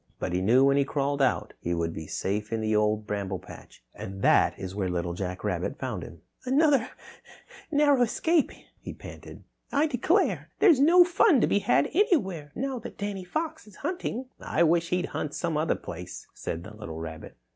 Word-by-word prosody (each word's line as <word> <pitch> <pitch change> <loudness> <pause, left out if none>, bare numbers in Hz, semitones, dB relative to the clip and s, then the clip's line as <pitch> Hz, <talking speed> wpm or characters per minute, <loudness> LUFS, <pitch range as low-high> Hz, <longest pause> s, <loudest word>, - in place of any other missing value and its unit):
But 90 - -3
he 90 - +1
knew 120 +7 +5
when 140 0 +4
he 140 - +4
crawled 140 0 -1
out 130 - +1
he 85 0 -2
would 85 -1 -2
be 80 -1 -7
safe 105 +5 -3
in 115 - -1
the 110 0 0
Old 105 0 +1
Bramble 100 -2 -3
Patch. 70 - -14
And 95 0 -7
that's 95 0 +3
where 95 -2 -2
Little 85 -1 -2
Jack 90 0 -5
Rabbit - - -2
found - - -4
him. 85 - -11 0.2
"Another 275 -1 +3 0.8
narrow 290 -3 +4
escape," 320 +7 +2 0.3
he - - -8
panted. - - -11 0.3
"I 285 +2 +3
declare, 315 - +1
there's 335 -10 +5
no 340 +6 +7
fun 345 - +4
to - - +5
be 200 - +2
had 140 -7 +2
anywhere 195 - +1
now 265 0 -2
that 240 - -9
Danny 200 -2 -4
Fox 315 - -4
is 210 - -15
hunting." 300 - -3
"I 170 - +1
wish 170 +1 +2
he'd 180 0 0
hunt 150 - -3
some 170 -3 -2
other 155 +2 +1
place," 90 +1 -8
said 85 - -5
the 105 +2 -11
little 85 -7 -7
rabbit. 80 -1 -8
150 Hz, 190 wpm, -27 LUFS, -, 0.8 s, no